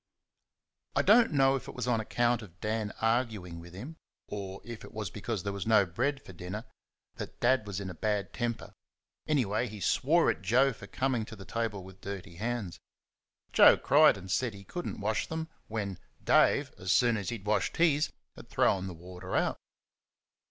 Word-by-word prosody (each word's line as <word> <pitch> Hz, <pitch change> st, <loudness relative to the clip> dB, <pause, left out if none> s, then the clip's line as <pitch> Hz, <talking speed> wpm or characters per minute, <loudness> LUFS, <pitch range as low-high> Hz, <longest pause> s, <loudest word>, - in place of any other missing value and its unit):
I -, -, +3 dB
don't 230 Hz, +2 st, +6 dB
know 135 Hz, -2 st, +4 dB
if 135 Hz, -, -5 dB
it -, -, -8 dB
was 125 Hz, -1 st, -3 dB
on 120 Hz, -2 st, +2 dB
account 120 Hz, +2 st, +1 dB
of 90 Hz, -4 st, -13 dB
Dan 110 Hz, -1 st, -2 dB
arguing 110 Hz, -7 st, 0 dB
with 85 Hz, +1 st, -12 dB
him, 140 Hz, +12 st, -8 dB, 0.3 s
or 100 Hz, -2 st, -5 dB
if 120 Hz, -2 st, -8 dB
it -, -, -12 dB
was 105 Hz, -4 st, -4 dB
because 105 Hz, -2 st, -4 dB
there 100 Hz, -, -2 dB
was 100 Hz, +1 st, -4 dB
no 110 Hz, -3 st, +5 dB
bread 130 Hz, +11 st, -1 dB
for 95 Hz, -, -10 dB
dinner, 90 Hz, +6 st, -6 dB, 0.5 s
that -, -, -7 dB
Dad 120 Hz, -3 st, +3 dB
was 100 Hz, -1 st, -3 dB
in 100 Hz, -, -5 dB
a 90 Hz, -, -5 dB
bad 105 Hz, +3 st, -1 dB
temper; 120 Hz, -2 st, -3 dB, 0.5 s
anyway, 125 Hz, -5 st, +1 dB
he 105 Hz, -1 st, -8 dB
swore 160 Hz, -, +3 dB
at -, -, -7 dB
Joe 125 Hz, +8 st, +3 dB
for 100 Hz, -, -11 dB
coming 130 Hz, -2 st, 0 dB
to 110 Hz, -, -9 dB
the 95 Hz, -2 st, -11 dB
table 110 Hz, -2 st, -2 dB
with 95 Hz, 0 st, -13 dB
dirty 95 Hz, -4 st, -7 dB
hands. 110 Hz, -4 st, -3 dB, 0.7 s
Joe -, -, +8 dB
cried 150 Hz, -5 st, +5 dB
and 95 Hz, -1 st, -8 dB
said 120 Hz, +3 st, +1 dB
that -, -, -10 dB
he 100 Hz, -, -11 dB
could 175 Hz, -, -5 dB
n't -, -, -5 dB
wash 105 Hz, +2 st, -1 dB
them 160 Hz, 0 st, -4 dB, 0.2 s
when 100 Hz, -4 st, -3 dB, 0.2 s
Dave, -, -, +4 dB
as 95 Hz, 0 st, -1 dB
soon 120 Hz, +2 st, +4 dB
as 100 Hz, -4 st, -3 dB
he 120 Hz, -, -2 dB
had 100 Hz, -, -17 dB
washed 105 Hz, 0 st, 0 dB
his, 155 Hz, -3 st, +3 dB, 0.2 s
had -, -, -13 dB
thrown 95 Hz, -1 st, +2 dB
the 90 Hz, -, -7 dB
water 90 Hz, +2 st, -7 dB
out. -, -, +1 dB
110 Hz, 200 wpm, -30 LUFS, 95-125 Hz, 0.7 s, Joe